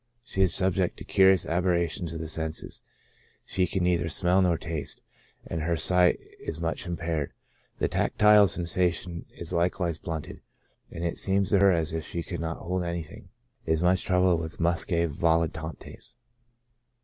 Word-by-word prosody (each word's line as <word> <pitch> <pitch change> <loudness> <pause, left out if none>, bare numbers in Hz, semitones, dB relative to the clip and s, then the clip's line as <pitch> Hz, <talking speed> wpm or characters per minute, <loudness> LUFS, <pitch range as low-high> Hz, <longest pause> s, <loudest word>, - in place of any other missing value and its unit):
She 95 -5 -3
is 95 -2 +4
subject 95 -1 +1
to - - -8
curious 95 -2 +4
aberrations 85 -1 0
of 85 - -5
the 80 0 -5
senses; 80 0 -4 0.6
she 90 -1 0
can 95 -2 -1
neither 85 -2 +1
smell 90 +3 +3
nor 90 -3 +2
taste, 80 -2 -5 0.4
and 80 - -4
her 85 +1 0
sight 90 +2 +3 0.2
is 80 - -5
much 85 +2 -3
impaired; 85 -4 -3 0.4
the - - 0
tactile 105 -1 +4
sensation 90 0 -1
is 85 +1 -6
likewise 85 -1 0
blunted, 80 -3 -6 0.5
and 85 - -7
it 85 - -1
seems 100 0 +2
to 100 - +4
her 100 0 +6
as 80 -2 0
if 80 -1 -3
she 85 - -4
could - - -6
not 85 0 -3
hold 90 +1 -3
anything; 85 -2 -6 0.4
is 80 +1 +1
much 90 0 +3
troubled 90 -2 +2
with 80 0 -7
muscae 85 0 +2
volitantes. 80 0 -2
85 Hz, 160 wpm, -27 LUFS, 80-90 Hz, 0.6 s, her